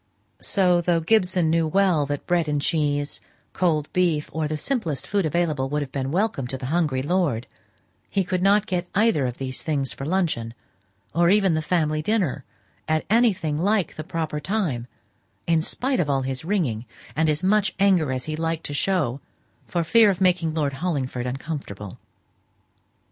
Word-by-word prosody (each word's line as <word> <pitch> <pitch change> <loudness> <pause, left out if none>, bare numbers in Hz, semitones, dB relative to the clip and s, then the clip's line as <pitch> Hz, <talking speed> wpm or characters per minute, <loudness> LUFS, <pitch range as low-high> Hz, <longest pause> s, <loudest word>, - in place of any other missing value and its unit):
So, 180 -3 +2
though 170 -1 +2
Mr. 160 - -8
Gibson 180 -5 +3
knew 165 -1 +2
well 175 -4 +2
that 145 0 -4
bread 175 -3 +1
and 145 -1 0
cheese, 145 -1 0 0.3
cold 155 -5 +1
beef, 170 -5 +1
or 160 -1 -1
the 155 0 -2
simplest 165 - -2
food 200 -5 0
available, 155 -5 0
would 150 +1 0
have 135 - -9
been 135 -1 -2
welcome 180 - 0
to 130 - -4
the 130 - -7
hungry 150 -7 +1
lord, 150 -8 0 0.6
he 195 - +1
could 180 0 -2
not 200 +2 +4
get 180 -3 -2
either 200 - +3
these 130 +1 -5
things 140 -4 -1
for - - -8
luncheon, 150 -9 -1 0.6
or 170 0 +3
even 195 -2 +4
the 155 - 0
family 155 -2 0
dinner, 195 - 0 0.4
at 155 0 0
anything 195 -10 +2
like 200 -1 +1
the 155 - -6
proper 160 -3 -3
time, 155 - -2 0.6
in 165 -1 +2
spite 260 - -1
of 150 - 0
all 135 -1 +1
his 130 +1 -3
ringing, 155 - -1 0.3
and 160 0 +2
as 155 +3 0
much 205 +2 +2
anger 185 -8 +3
as 130 -1 -3
he 155 - -3
liked 165 0 -2
to 145 - -4
show, 145 -5 0 0.5
for 170 -1 0
fear 220 +5 +5
of 185 -3 0
making 180 -3 +2
Lord 150 -3 -1
Hollingford 130 -5 -2
uncomfortable. 125 - -6
160 Hz, 175 wpm, -24 LUFS, 145-185 Hz, 0.6 s, fear